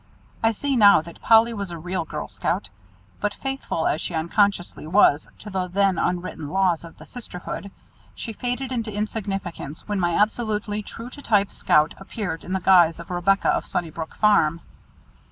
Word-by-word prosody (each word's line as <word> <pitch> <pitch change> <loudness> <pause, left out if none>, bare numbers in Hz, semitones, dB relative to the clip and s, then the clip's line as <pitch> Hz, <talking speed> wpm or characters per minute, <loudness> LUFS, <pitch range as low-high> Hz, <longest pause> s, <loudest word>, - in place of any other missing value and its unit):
I 225 - +4
see 275 +5 -1
now 205 -7 +7
that 170 +1 -13
"Polly" 230 +1 +5
was 200 -3 -4
a 170 - -6
real 175 +1 -3
girl - - -5
scout, 100 - -2 0.5
but 205 0 -1
faithful 270 -11 -3
as 155 - +1
she 175 - -3
unconsciously 175 0 0
was 160 -4 +4
to 210 - -10
the 185 -1 -1
then 195 0 +2
unwritten 175 -4 -2
laws 185 -2 +1
of 170 - -12
the - - -13
sisterhood, 200 -4 -7 0.5
she 225 - -5
faded 250 +3 -3
into 230 -3 -2
insignificance 195 -7 -4
when 205 -2 -1
my 175 -2 +1
absolutely 210 -1 0
true 230 +4 -9
to 285 - -10
type 205 -6 +2
Scout 150 +1 +3
appeared 195 -4 -5
in 185 - -5
the 190 - +1
guise 170 -2 +5
of 170 - -9
Rebecca 190 +3 +2
of - - +1
Sunnybrook 160 -1 -3
Farm. 170 -6 +3
195 Hz, 170 wpm, -24 LUFS, 170-215 Hz, 0.5 s, now